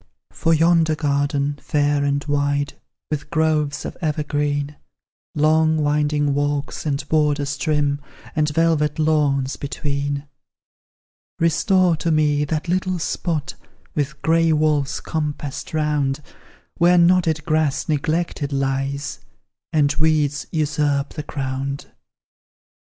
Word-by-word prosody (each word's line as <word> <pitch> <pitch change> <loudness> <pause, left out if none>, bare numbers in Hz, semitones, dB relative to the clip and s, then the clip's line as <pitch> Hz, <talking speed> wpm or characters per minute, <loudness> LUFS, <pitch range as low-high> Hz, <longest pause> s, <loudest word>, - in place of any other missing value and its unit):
For 165 - 0
yonder 165 0 +4
garden, 145 -1 0
fair 145 -1 +1
and 140 0 0
wide, 145 -1 0 0.4
With 145 -1 -3
groves 155 -3 0
of - - -5
evergreen, 145 -2 -1 0.6
Long 155 +1 +3
winding 145 -1 +1
walks, 145 +1 -2
and 140 0 -2
borders 145 -2 +1
trim, 145 -1 0 0.3
And 155 -1 +2
velvet 150 -1 +1
lawns 145 -4 +1
between; 140 0 -3 1.1
Restore 170 +1 +3
to 165 - -1
me 150 -2 +2
that 155 +3 -2
little 185 +1 0
spot, 160 -2 -2 0.4
With 150 0 -2
gray 165 +1 +3
walls 150 -2 +1
compassed 150 -3 -4
round, 150 -2 0 0.6
Where 175 +1 +5
knotted 170 -3 +3
grass 155 -3 +1
neglected 155 0 -1
lies, 135 +1 -2 0.5
And 145 -3 +3
weeds 150 -2 +1
usurp 145 -2 0
the 150 - -4
ground. 140 -1 -4
150 Hz, 105 wpm, -21 LUFS, 145-155 Hz, 1.1 s, Where